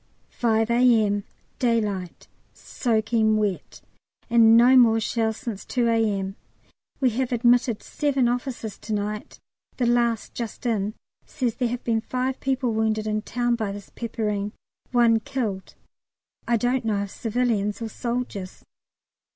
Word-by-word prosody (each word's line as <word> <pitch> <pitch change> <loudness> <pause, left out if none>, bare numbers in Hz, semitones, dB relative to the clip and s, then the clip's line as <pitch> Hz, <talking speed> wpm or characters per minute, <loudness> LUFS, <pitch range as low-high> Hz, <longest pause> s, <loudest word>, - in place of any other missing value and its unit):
5 225 -1 +1
A.M. 225 -4 +3 0.3
Daylight 210 -7 -1 0.3
soaking 220 -2 +1
wet, 205 -3 -3 0.5
and 230 -1 +7
no 245 +3 +6
more 230 -3 +6
shells 225 0 -1
since 230 -8 -6
2 240 -2 0
A.M. 205 -4 0 0.6
We 255 -3 +3
have 255 +2 -2
admitted 240 -1 +2
seven 275 -4 0
officers 245 -3 -3
to 215 - -5
night; 210 +1 -4 0.4
the 250 - +1
last 235 -2 +1
just 235 0 -6
in 215 -2 0 0.3
says 250 -6 -2
there 245 -2 0
have 245 +1 -4
been 225 -1 +1
five 255 +2 -2
people 260 -3 0
wounded 220 -1 0
in 215 0 0
the - - -2
town 240 +2 -1
by 220 -4 -2
this 200 -1 -9
peppering 210 -3 -3 0.4
one 235 -2 +4
killed. 215 -5 -4 0.7
I 235 - +3
don't 245 +2 0
know 210 -3 0
if 200 - -7
civilians 225 -3 -1
or 230 -1 -4
soldiers. 235 -6 -4
230 Hz, 140 wpm, -24 LUFS, 215-245 Hz, 0.7 s, and